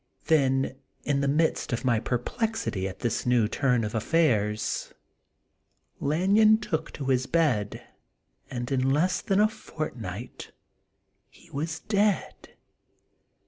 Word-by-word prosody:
Then 135 -4 +2 0.3
in 140 -1 0
the 140 - +1
midst 155 +4 +1
of 120 +1 -2
my 120 -3 +3
per 125 +2 -1
plexity 215 - -2
at 95 - -11
this 120 - -1
new 120 -3 +3
turn 125 0 +1
of 105 - -3
affairs, 110 -5 0 1.0
Lan 175 +8 +1
yon 215 0 +6
took 210 -7 -3
to 140 - -6
his 130 -1 +1
bed, 130 -12 0 0.7
and 120 0 -4
in 130 0 +2
less 160 +7 +2
than 195 0 +1
a 210 - +6
fortnight 120 - -7 0.8
he - - -21
was 155 +3 -3
dead. 205 -3 -1
135 Hz, 130 wpm, -27 LUFS, 120-165 Hz, 1.0 s, yon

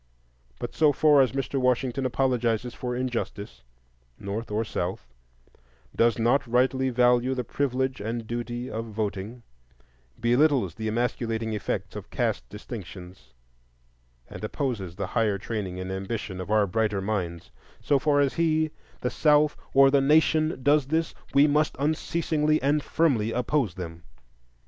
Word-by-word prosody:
But - - -6
so 155 -2 +4
far 145 0 +5
as 130 - +2
Mr. 135 0 -2
Washington 125 +1 +1
apologizes 125 -2 0
for 125 -1 -4
injustice, 115 - -4 0.6
North 105 +4 -5
or 110 +2 -1
South, 90 -7 -3 0.9
does 115 -1 +3
not 120 +4 +2
rightly 130 +2 +2
value 125 +1 +3
the 125 - -2
privilege 130 0 -1
and 115 +2 -3
duty 120 +1 -4
of 115 -1 -4
voting, 105 +1 -4 0.8
belittles 120 - +3
the 110 +4 -5
emasculating 115 -1 -1
effects 105 - -3
of - - -8
caste - - -2
distinctions, 95 - -10 0.9
and - - -10
opposes 105 - -3
the 100 0 -3
higher 110 -3 0
training 100 -3 -4
and 95 0 -5
ambition 95 0 -4
of 90 - -7
our 105 -1 +4
brighter 105 +1 0
minds,—so 95 - -3
far 145 0 +3
as 140 -2 +1
he, 160 -2 +1 0.3
the 125 - -1
South, 150 -1 +3 0.2
or 135 0 +6
the 140 -1 +4
Nation, 155 +1 +3
does 145 -1 +3
this,—we 155 -2 +1
must 150 +1 +2
unceasingly 155 +1 0
and 145 +2 +2
firmly 130 -10 +1
oppose 125 - 0
them. 85 -3 -7
120 Hz, 135 wpm, -26 LUFS, 105-140 Hz, 0.9 s, or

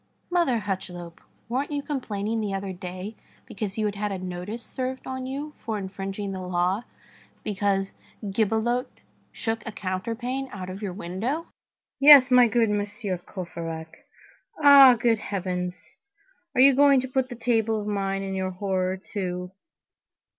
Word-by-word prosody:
"Mother 340 -9 +3
Hucheloup, 185 -4 -5 0.3
weren't 260 +5 -1
you 290 -1 -2
complaining 225 -6 -2
the 200 -2 -2
other 195 0 -4
day 185 +3 -7 0.3
because 200 -1 -5
you 215 - +1
had 205 - 0
had 205 0 -2
a 195 - -2
notice 185 +5 -5
served 260 +2 -4
on 260 0 -4
you 285 +3 -5
for 220 -2 -3
infringing 195 +1 -5
the 190 -1 -5
law, 180 +4 0 0.6
because 195 -1 0 0.3
Gibelotte 225 +5 0 0.3
shook 225 -1 -3
a 225 - -5
counterpane 230 +8 -3
out 185 -2 -6
of 190 +3 -8
your 200 -3 -3
window?" 215 - -3 0.5
"Yes, 275 -2 +9
my 250 -1 +7
good 225 -2 +2
Monsieur 205 -2 -2
Courfeyrac. 165 -3 -7 0.5
Ah! 280 -4 +9
good 230 -1 +2
Heavens, 180 -3 -3 0.8
are 255 - +5
you 275 +1 +8
going 280 0 +6
to 260 - -4
put 260 0 0
that 245 -2 -8
table 225 -2 +2
of 205 - -5
mine 195 -1 -1
in 195 0 -4
your 190 0 -1
horror, 185 0 -1
too? 180 -2 -4
205 Hz, 150 wpm, -26 LUFS, 185-245 Hz, 0.8 s, Yes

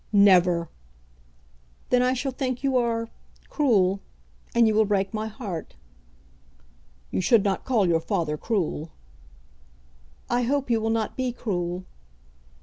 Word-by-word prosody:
"Never!" 180 -4 +5 1.2
"Then 250 - +4
I 250 +1 +2
shall 265 +1 -2
think 255 0 -3
you 270 -1 +1
are 230 -2 +1 0.4
cruel; 200 -10 +2 0.6
and 235 -1 +5
you 220 - +2
will 220 +1 +4
break 195 -1 0
my 215 0 -2
heart." 205 -7 -7 1.4
"You - - 0
should 215 +2 +4
not 195 -2 -1
call 225 -7 +2
your 165 -1 +3
father 160 -2 -1
cruel." 170 -4 -2 1.4
"I 240 +1 +1
hope 270 +1 0
you 225 -1 +2
will 225 - -1
not 225 -1 -1
be 255 -1 -1
cruel." 180 -6 -3
220 Hz, 135 wpm, -25 LUFS, 185-245 Hz, 1.4 s, Never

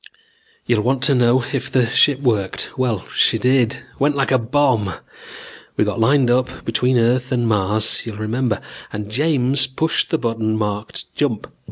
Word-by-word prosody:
"You'll 120 -3 +2
want 130 +3 0
to 140 - +3
know 125 0 +3
if 135 - -2
the 125 -2 +2
ship 130 +4 +3
worked. 105 -8 -1
Well, 125 -6 -1
she - - +3
did. 125 -2 +1 0.2
Went 145 +1 +2
like 135 -1 0
a 130 - +4
bomb. 115 -5 +1 0.8
We - - +3
got 105 +2 -2
lined 130 +2 +3
up 130 +1 -1
between 125 +3 +1
Earth 125 +3 +1
and 120 -2 +1
Mars, 105 +2 +1
you'll 110 -2 -6
remember, 110 +1 -1 0.3
and 105 0 -6
James 135 0 +1
pushed 155 +5 -1
the 160 - +1
button 115 -4 -1
marked 105 0 -4
'Jump'. 130 -8 -1
120 Hz, 165 wpm, -19 LUFS, 110-130 Hz, 0.8 s, a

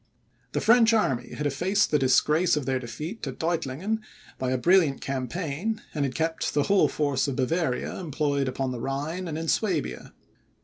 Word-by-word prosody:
The - - 0
French 230 0 +5
army 135 - 0
had 150 - -3
effaced 180 +9 +1
the 150 - +3
disgrace 150 +5 +3
of 145 - -2
their 130 0 0
defeat 150 - -6
at 130 - -5
Deutlingen 170 +5 -1 0.4
by 130 - -1
a 130 - +1
brilliant 165 -1 +3
campaign, 155 - -3
and 145 -2 0
had 130 - -4
kept 160 0 -1
the 145 - +3
whole 200 +4 +4
force 145 -2 0
of 140 - -2
Bavaria 135 +1 -1
employed 145 -4 -1
upon 130 0 -2
the 125 - -5
Rhine 150 +8 -3
and 155 -2 -4
in 165 0 -4
Suabia. 180 -6 -1
150 Hz, 175 wpm, -26 LUFS, 135-180 Hz, 0.4 s, French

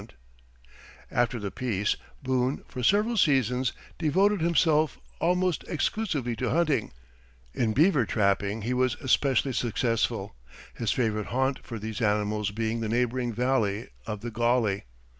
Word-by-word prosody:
After 120 0 +1
the 100 -3 -4
peace, 105 -5 -1 0.3
Boone 130 +1 0
for 130 - -6
several 210 - +3
seasons 130 - +2 0.3
devoted 190 +5 +2
himself 160 -2 +2 0.2
almost 180 0 +1
exclusively 155 - -1
to 125 - -1
hunting; 155 -7 +1 0.6
in 110 -3 0
beaver 145 - +4
trapping 100 0 +1
he 120 +3 -1
was 130 0 +1
especially 135 -1 +1
successful, 115 - -1 0.4
his 115 - -1
favorite 110 -4 0
haunt 130 +2 0
for 115 - -6
these 110 +2 -5
animals 105 -1 +1
being 110 +2 -2
the 110 -1 -2
neighboring 120 +1 0
Valley 115 -2 0 0.2
of 105 -2 -4
the 120 +1 -5
Gauley. 115 -3 +1
125 Hz, 130 wpm, -27 LUFS, 110-140 Hz, 0.6 s, beaver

